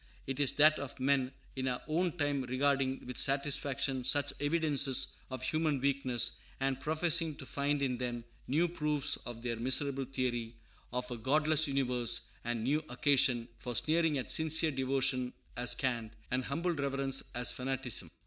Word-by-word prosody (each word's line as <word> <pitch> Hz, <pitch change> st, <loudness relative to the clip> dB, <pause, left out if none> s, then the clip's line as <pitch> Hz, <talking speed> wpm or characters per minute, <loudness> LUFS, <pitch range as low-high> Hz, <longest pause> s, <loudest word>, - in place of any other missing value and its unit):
It 135 Hz, +1 st, -4 dB
is 140 Hz, -3 st, +3 dB
that 155 Hz, +1 st, +5 dB
of 140 Hz, -1 st, -6 dB
men 130 Hz, -1 st, +2 dB, 0.2 s
in 130 Hz, 0 st, -2 dB
our 125 Hz, -1 st, -1 dB
own 170 Hz, +2 st, 0 dB
time 145 Hz, -2 st, 0 dB
regarding 135 Hz, +1 st, 0 dB
with 125 Hz, -1 st, -4 dB
satisfaction 135 Hz, -1 st, +1 dB
such 140 Hz, +3 st, +2 dB
evidences 145 Hz, -4 st, +2 dB, 0.2 s
of 130 Hz, -1 st, -5 dB
human 155 Hz, +1 st, 0 dB
weakness, 130 Hz, -3 st, +1 dB, 0.2 s
and 135 Hz, -1 st, 0 dB
professing 160 Hz, +2 st, +1 dB
to -, -, -10 dB
find 140 Hz, 0 st, -1 dB
in 125 Hz, -3 st, -1 dB
them 120 Hz, -2 st, -3 dB, 0.2 s
new 160 Hz, +6 st, +2 dB
proofs 150 Hz, -4 st, 0 dB
of 120 Hz, -1 st, -7 dB
their 120 Hz, -2 st, -2 dB
miserable 135 Hz, +3 st, 0 dB
theory 120 Hz, -3 st, -3 dB, 0.4 s
of 125 Hz, 0 st, -3 dB
a 120 Hz, -, -4 dB
godless 150 Hz, +5 st, +2 dB
universe, 125 Hz, -4 st, +1 dB, 0.2 s
and 120 Hz, -1 st, -2 dB
new 150 Hz, +5 st, +1 dB
occasion 125 Hz, -2 st, +3 dB
for 125 Hz, -1 st, -5 dB
sneering 160 Hz, +1 st, +2 dB
at 130 Hz, -, -3 dB
sincere 160 Hz, 0 st, +3 dB
devotion 130 Hz, -1 st, 0 dB, 0.2 s
as 120 Hz, 0 st, +1 dB
cant, 120 Hz, -4 st, -1 dB, 0.2 s
and 125 Hz, 0 st, +1 dB
humble 170 Hz, +5 st, -1 dB
reverence 135 Hz, -2 st, 0 dB
as 120 Hz, 0 st, +2 dB
fanaticism. 130 Hz, -1 st, -1 dB
135 Hz, 160 wpm, -32 LUFS, 125-145 Hz, 0.4 s, that